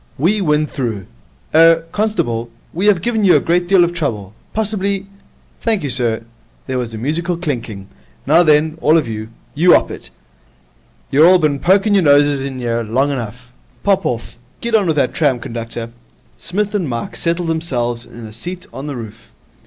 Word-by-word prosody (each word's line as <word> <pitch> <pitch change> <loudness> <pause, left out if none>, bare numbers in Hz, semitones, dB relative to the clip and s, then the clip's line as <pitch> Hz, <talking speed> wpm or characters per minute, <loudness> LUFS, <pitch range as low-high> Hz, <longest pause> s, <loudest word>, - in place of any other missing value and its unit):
We 195 +9 +1
win 150 -3 +2
through. 115 -9 -4 0.5
Er 165 +1 +6
constable, 170 - -1 0.2
we 185 +5 0
have 190 -5 +3
given 225 -2 0
you 190 - +6
a - - +5
great 175 +1 0
deal 190 -1 +5
of 175 0 0
trouble. 110 - -3 0.2
Possibly 200 -2 -2 0.3
?' - - -35
'Thank 220 -7 0
you, 140 - -1
sir.' 115 -3 +1 0.4
There 130 -1 -2
was 115 -2 -4
a - - -5
musical 165 +8 -1
clinking. 115 - -4 0.4
'Now 160 +5 +5
then, 155 0 +3
all 155 +2 +5
of 150 -6 0
you, 110 -1 -5 0.2
you 175 +4 +5
'op - - +1
it. - - -8 1.0
You're 150 +4 +6
all 185 +1 +7
bin 150 -5 0
poking 195 +6 +3
your 200 - +4
noses 145 -2 +4
in 135 -1 -5
'ere 115 0 -1
long 130 +6 0
enough. 125 -1 -6 0.3
Pop 195 -1 +2
off. 115 0 -5 0.2
Get 235 0 -4
on 210 -4 +3
with 160 - +1
that 140 -4 +1
tram, 140 -6 +1
conductor.' 115 0 -6 0.4
Psmith 205 +3 -3
and 185 -8 -1
Mike 115 -1 -4
settled 170 0 -1
themselves 120 -8 -2
in 120 -1 -11
a 110 - -10
seat 180 - -7
on 135 +2 -6
the 140 -3 -4
roof. 115 -1 -10
150 Hz, 185 wpm, -17 LUFS, 120-180 Hz, 1.0 s, all